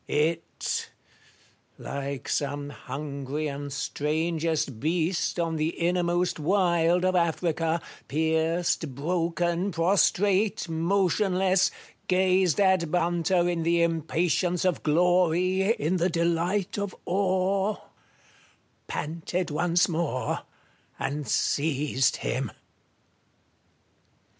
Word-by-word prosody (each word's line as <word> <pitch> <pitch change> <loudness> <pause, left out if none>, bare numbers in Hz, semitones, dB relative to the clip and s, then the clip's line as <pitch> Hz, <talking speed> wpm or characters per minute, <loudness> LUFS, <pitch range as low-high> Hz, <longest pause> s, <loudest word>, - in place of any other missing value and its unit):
It 160 +3 -1 0.4
— - - -31 0.2
like 140 -1 -5
some 145 0 -2
hungry 140 +2 -5
and 145 0 -5
strangest 155 -2 -1
beast 170 +4 0
on 165 -1 -1
the 155 +2 -1
innermost 175 0 +1
wild 175 0 +2
of 185 0 +2
Africa, 165 -1 +1 0.3
pierced, 160 -1 0
broken, 170 +4 0
prostrate, 195 +4 +2
motionless, 185 +2 +2 0.4
gazed 185 -2 +3
at 190 -4 +3
by 180 - +1
its 175 - +2
hunter 175 +1 +1
in 175 -1 -1
the 170 +1 +2
impatience 170 +2 0
of 180 -2 +1
glory, 180 +4 +2
in 175 -1 -1
the 175 +2 +1
delight 170 +4 0
of 200 -2 -3
awe 190 +2 +1 0.6
— - - -33
panted 165 +3 -3
once 175 +3 +2
more, 160 -6 -1 0.6
and 145 0 -3
seized 140 +1 +1
him. - - -1
170 Hz, 100 wpm, -27 LUFS, 155-180 Hz, 0.6 s, gazed